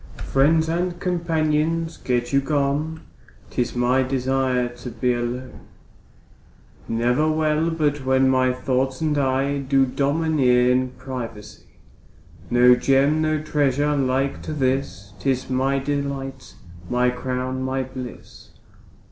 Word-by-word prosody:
Friends 160 +4 +3
and 175 +1 -1
companions 165 -2 0
get 120 0 -2
you 140 - +4
gone, 145 +3 -1 0.5
'Tis 125 0 -2
my 125 +2 +2
desire 130 -1 0
to 125 0 -7
be 120 +2 0
alone; 120 +2 -4 1.3
Ne'er 125 +7 +1
well 155 +1 +1
but 150 -3 -1
when 130 0 +3
my 130 -1 +3
thoughts 130 +1 -1
and 155 -2 0
I 135 +1 0
Do 135 0 +2
domineer 135 -3 +2
in 130 0 +1
privacy. 115 -7 -8 0.8
No 125 +1 +6
Gem, 140 +4 +2
no 155 -1 0
treasure 145 -1 +1
like 135 0 0
to - - -5
this, 130 -8 -2
'Tis 130 -1 -1
my 135 +2 +1
delight, 140 -1 -4 0.3
my 125 0 +2
crown, 130 +1 -3
my 130 0 -1
bliss. 130 -1 -10
135 Hz, 120 wpm, -22 LUFS, 125-150 Hz, 1.3 s, No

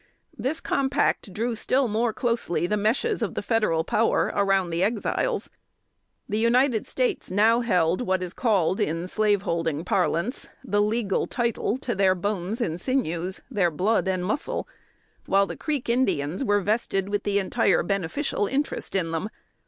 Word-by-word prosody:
This 265 +8 -2
compact 265 -6 0
drew 230 +6 -2
still 255 +4 +2
more 225 +2 +1
closely 230 -7 -1
the 210 - 0
meshes 230 - +1
of - - -2
the - - -3
federal 215 -9 +1
power 225 +6 +1
around 195 -3 +2
the 165 +1 -1
Exiles. 225 - 0 0.8
The 210 +1 -1
United 235 0 +2
States 255 -1 -1
now 220 +5 +4
held 180 -4 +2
what 190 -5 0
is 180 0 -5
called 200 -7 +1
in 165 +3 -1
slaveholding 185 -7 0
parlance 190 - 0
the 205 -5 +1
"legal 210 -2 0
title" 235 -1 -1
to 255 -2 -3
their 190 -2 +3
bones 200 +4 -2
and 170 -6 -2
sinews, 185 -8 -1
their 195 -7 +2
blood 190 +6 +1
and 185 -1 0
muscle, 290 - -2 0.6
while 195 +1 +4
the - - -6
Creek 295 -5 -3
Indians 235 - 0
were 205 -4 +2
vested 195 -2 0
with 205 0 -1
the 205 -1 0
entire 200 +4 +2
beneficial 200 - -1
interest 275 -2 -2
in 170 -4 0
them. 165 +6 -2
205 Hz, 155 wpm, -25 LUFS, 185-235 Hz, 0.8 s, now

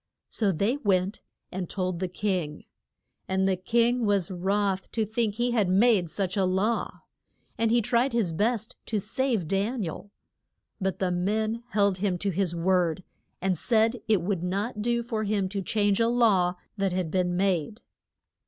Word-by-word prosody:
So 210 -4 +1
they 200 - 0
went 195 -5 0 0.3
and 185 -2 -4
told 185 -3 -2
the 185 - -1
king, 180 -5 -2 0.6
and 190 0 +1
the 190 - +2
king 235 +6 +1
was 200 -4 +1
wroth 195 +1 -1
to 220 -2 +1
think 220 -1 -1
he 240 +2 0
had 215 -6 +2
made 195 -2 +4
such 185 +1 -2
a 195 - +2
law. 190 +5 0 0.5
And 230 0 +1
he 235 0 +3
tried 245 +3 +2
his 225 -7 0
best 220 +5 -1
to 215 - 0
save 225 - -1
Dan 205 +6 0
i - - -2
el. 195 +5 -9 0.7
But 190 -2 -1
the 185 -2 0
men 215 +5 0
held 200 -5 +2
him 190 -2 0
to 200 +2 -1
his 180 -1 -1
word, 180 0 +1 0.4
and 190 -1 +2
said 225 0 +2
it 210 -6 +3
would 190 -2 -1
not 200 +5 -2
do 235 +1 0
for 225 -2 -2
him 200 -2 0
to 200 0 -3
change 205 +1 +1
a 230 - +3
law 210 -7 +3 0.2
that 195 -1 0
had 180 -3 -2
been 180 -1 0
made. 190 +1 0
200 Hz, 175 wpm, -27 LUFS, 185-225 Hz, 0.7 s, made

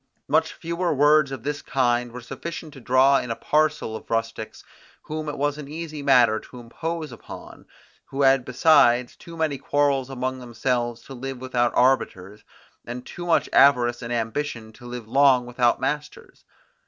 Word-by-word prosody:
Much - - +2
fewer 170 +1 -2
words 145 0 +4
of 130 -4 -6
this 145 +1 -3
kind 120 -2 0
were 125 +1 -8
sufficient 155 +5 -7
to 135 - -12
draw 130 +3 +4
in 125 - -6
a 115 - -2
parcel 150 -7 0
of - - -10
rustics, 115 -1 -3 0.4
whom 155 0 -5
it 145 - -5
was 145 +1 -1
an 145 - -8
easy 155 0 -6
matter 125 -6 +4
to 125 - -13
impose 160 +6 -5
upon, 120 - -12 0.4
who 140 +1 -2
had 135 -1 +4
besides 125 -2 +3
too 170 -1 -12
many 155 -4 -1
quarrels 140 -2 +1
among 130 0 -3
themselves 120 0 -2
to 135 - -11
live 135 +1 -6
without 125 -2 0
arbiters, 105 -6 +1 0.4
and 125 +1 -7
too 175 0 -8
much 170 - +2
avarice 120 -3 +4
and 120 0 -6
ambition 115 0 -3
to 120 - -13
live 120 -2 -7
long 130 0 +4
without 120 0 +1
masters. 150 +3 -5
130 Hz, 165 wpm, -24 LUFS, 120-145 Hz, 0.4 s, words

